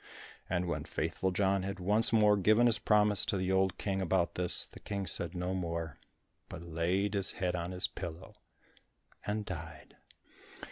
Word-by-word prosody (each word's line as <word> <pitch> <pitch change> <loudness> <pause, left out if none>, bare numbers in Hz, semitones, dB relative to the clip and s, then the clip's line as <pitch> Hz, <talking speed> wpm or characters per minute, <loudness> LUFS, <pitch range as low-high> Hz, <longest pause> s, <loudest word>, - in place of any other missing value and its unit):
And 90 0 0
when 85 - -3
Faithful 95 - -2
John 95 +1 +1
had 95 +1 -5
once 105 +5 +2
more 105 -2 +5
given 110 +4 +4
his 115 -3 +3
promise 105 -2 +3
to 100 - 0
the 95 0 -1
old 95 0 +1
King 95 -1 -2
about 90 -1 +1
this, 90 -3 +5
the - - -12
King 100 -2 -4
said 85 0 -2
no 90 +1 -2
more, 85 -4 -4 0.5
but - - -8
laid 85 +5 -1
his 100 -2 -1
head 90 -1 -2
on 85 0 -3
his 90 0 -1
pillow, 85 0 -7 0.9
and 105 0 -2
died. 85 -4 -8
95 Hz, 170 wpm, -32 LUFS, 90-100 Hz, 0.9 s, more